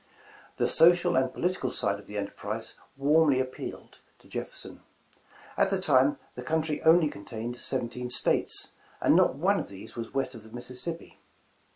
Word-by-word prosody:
The - - +2
social 175 +1 +5
and 130 0 +2
political 185 +2 -1
side 100 0 0
of 100 - -15
the 105 - -6
enterprise 105 +2 -5 0.2
warmly 145 0 +4
appealed 130 0 -6 0.2
to - - -22
Jefferson. - - -5 0.7
At 195 - +2
the 195 -1 0
time, 140 -5 +3 0.2
the 125 - -7
country 155 +2 -1
only 160 0 +5
contained 115 0 -6
seventeen 125 -1 -2
States, 125 - +2 0.3
and - - +4
not - - +4
one - - +2
of - - -6
these 100 -1 -10
was 115 -1 -6
west 135 -1 -2
of 115 - -10
the 110 - -15
Misissippi. 125 +8 -6
130 Hz, 160 wpm, -28 LUFS, 115-160 Hz, 0.7 s, social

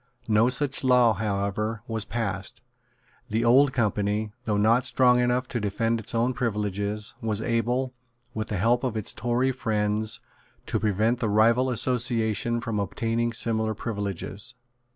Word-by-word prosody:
No 110 +2 +4
such 135 +1 0
law, 125 -3 +5
however, 105 +2 -2
was 110 -2 -2
passed. 100 -2 -3 0.7
The 110 +2 0
Old 130 +4 +5
Company, 105 -2 0
though 105 -2 0
not 115 +4 +3
strong 125 -1 +3
enough 125 +1 +1
to 120 - -2
defend 115 +2 0
its 115 +1 -3
own 120 +3 +1
privileges, 105 -2 -2
was 110 -2 0
able, 120 +3 -1 0.4
with 110 -1 -3
the 105 - -3
help 120 +6 +2
of 120 -4 -1
its 110 - -2
Tory 120 +3 0
friends, 110 -3 -1 0.5
to 110 - -1
prevent 110 +3 +1
the 115 - 0
rival 115 +5 +3
association 120 -2 +1
from 110 -2 -2
obtaining 115 +4 -1
similar 110 -1 0
privileges. 100 +2 -4
115 Hz, 145 wpm, -26 LUFS, 105-120 Hz, 0.7 s, law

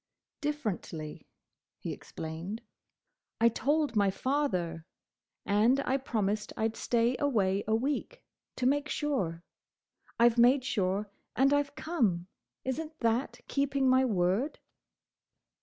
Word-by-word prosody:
"Differently," 210 - -4 0.5
he - - -4
explained. 170 +8 -6 0.8
"I 230 +1 +6
told 290 +2 0
my 200 -2 +4
father; 190 - -1 0.6
and 220 +6 +4
I 270 0 +1
promised 215 -5 -1
I 220 0 +2
'd 220 - -11
stay 235 +2 +1
away 205 -9 +2
a 220 - +3
week, 285 - -2 0.3
to 250 - -2
make 290 +3 +2
sure. 190 - -1 0.8
I 235 - +8
've 240 0 +2
made 255 +2 +5
sure, 200 -3 0 0.2
and 275 +2 +4
I 290 - +5
've 285 0 -9
come. 225 - 0 0.4
Is 260 +3 -1
n't 315 0 -9
that 230 +3 0
keeping 275 -1 +1
my 260 0 +5
word?" 205 - +1
235 Hz, 125 wpm, -30 LUFS, 200-280 Hz, 0.8 s, I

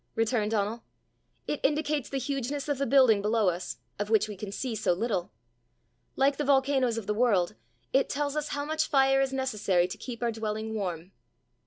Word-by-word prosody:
returned 225 -2 +1
Donal. 220 +1 -1 0.6
"It 295 - -2
indicates 295 -1 0
the 275 - -2
hugeness 275 +1 -3
of 290 -2 -1
the 275 - 0
building 255 -7 +5
below 215 -1 +2
us, 175 +1 -4 0.2
of 205 0 -2
which 220 -1 +3
we 210 - -6
can 195 +1 -7
see 245 +4 -3
so 215 -4 +1
little. 190 -2 -2 0.8
Like 275 +1 +2
the 295 - -1
volcanoes 265 -3 +2
of 225 - -4
the 210 - 0
world, 210 -6 +2 0.4
it 270 +1 +3
tells 290 +1 -1
us 300 0 -1
how 285 0 -3
much 315 +1 0
fire 270 -1 +4
is 270 -1 0
necessary 210 -9 +1
to - - -8
keep 245 -2 -6
our 235 - +1
dwelling 220 0 -3
warm." 180 -4 -4
235 Hz, 190 wpm, -28 LUFS, 210-275 Hz, 0.8 s, building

